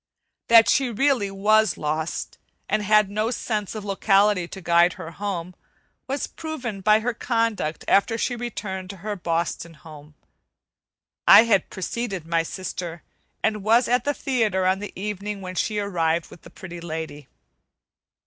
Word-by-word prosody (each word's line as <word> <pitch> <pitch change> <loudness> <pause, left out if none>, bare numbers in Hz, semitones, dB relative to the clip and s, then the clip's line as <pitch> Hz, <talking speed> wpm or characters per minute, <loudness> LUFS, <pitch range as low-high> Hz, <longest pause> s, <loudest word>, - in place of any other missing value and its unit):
That 230 -1 +7
she 265 -2 +3
really 240 -3 +1
was 210 -1 +2
lost, 155 +2 -3 0.3
and 215 - 0
had 210 0 +4
no 215 +3 -1
sense 215 -4 -3
of 210 -2 -6
locality 195 -2 +2
to 190 - -9
guide 170 0 +3
her 165 - -8
home, 185 -1 -4 0.5
was 275 +2 -2
proven 255 -11 -6
by 215 +2 +4
her 245 +2 -1
conduct 230 -10 -1
after 225 +3 +3
she 245 - -1
returned 200 -6 -5
to 200 - -8
her 210 -1 -2
Boston 170 -1 -3
home. 150 -1 -14 1.1
I - - +10
had 205 -6 +2
preceded 195 -2 -4
my 165 0 +1
sister, 170 -1 -6 0.4
and 215 -1 0
was 230 +4 +4
at 245 +1 +2
the 290 0 -1
theatre 220 -8 0
on 190 +1 +2
the 205 - -6
evening 205 0 -4
when 185 -1 -7
she 210 +3 -1
arrived 170 -5 -1
with - - -13
the - - -14
Pretty 175 -2 -10
Lady. 160 -3 -6
200 Hz, 155 wpm, -24 LUFS, 170-220 Hz, 1.1 s, I